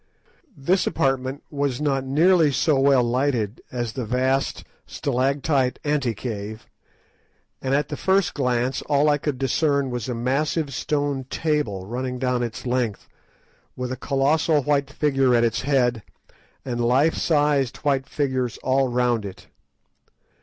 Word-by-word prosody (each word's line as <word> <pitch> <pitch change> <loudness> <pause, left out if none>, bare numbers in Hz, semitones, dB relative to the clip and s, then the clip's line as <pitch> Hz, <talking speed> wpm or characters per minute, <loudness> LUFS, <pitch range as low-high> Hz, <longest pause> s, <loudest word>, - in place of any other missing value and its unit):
This 175 +8 +1
apartment 135 +1 -1
was 140 -4 -1
not 140 -3 0
nearly 160 +3 +4
so 140 +1 +2
well 135 -2 +4
lighted 120 -3 -1
as 120 -3 -3
the 130 - -3
vast 130 +4 0 0.2
stalactite 135 0 0
ante 140 -6 0
cave, 110 -1 -6 1.0
and 135 +1 0
at 145 0 0
the 150 - -3
first 190 +4 +1
glance 125 -1 0
all 145 +1 +3
I 145 0 +2
could 145 -2 -2
discern 140 +1 +1
was 125 0 -4
a 125 - -2
massive 140 +5 -1
stone 145 -1 -1
table 135 - -1
running 125 +4 -4
down 125 -1 0
its 120 -1 -5
length, 125 -4 -1 0.7
with 125 0 -4
a - - -2
colossal 145 +3 +1
white 140 -1 +1
figure 135 -4 +2
at 120 - +3
its 115 -1 0
head, 125 -4 +1 0.6
and 120 -2 -2
life 135 +7 +3
sized 145 -5 +1
white 135 -2 +1
figures 130 -5 -1
all 130 0 +2
round 120 -2 +1
it. 95 -2 -9
135 Hz, 140 wpm, -23 LUFS, 125-145 Hz, 1.0 s, nearly